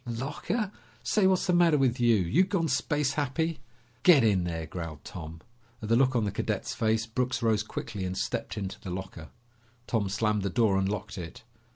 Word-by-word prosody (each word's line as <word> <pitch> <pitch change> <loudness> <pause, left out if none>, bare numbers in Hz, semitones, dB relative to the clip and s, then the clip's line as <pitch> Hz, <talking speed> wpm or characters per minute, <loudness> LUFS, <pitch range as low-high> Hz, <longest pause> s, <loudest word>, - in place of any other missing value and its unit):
"Locker? 145 - -2 0.3
Say, 205 -3 +3
what's 190 -1 +2
the 180 - +2
matter 170 -3 +5
with 130 -2 +1
you? 120 -1 +5
You 105 - +3
gone 180 -3 0
space 145 0 0
happy?" 155 +3 -1 0.4
"Get 160 -8 +7
in 100 -5 +3
there," 80 -2 -3
growled 80 -2 -7
Tom. 80 -1 -8 0.4
At 110 - -6
the 115 - +4
look 130 +1 +3
on 115 - +2
the 100 - -1
cadet's - - -2
face, 110 0 +1
Brooks 125 +2 -2
rose 110 -2 +3
quickly 105 -1 -5
and 95 0 -3
stepped - - -3
into 95 -2 -4
the 95 - -8
locker. 90 -3 -6 0.6
Tom 105 -4 0
slammed 105 +1 0
the 100 - -1
door 110 -2 +2
and 95 0 0
locked 100 -2 -4
it. 85 -2 -8
115 Hz, 195 wpm, -28 LUFS, 95-145 Hz, 0.6 s, Get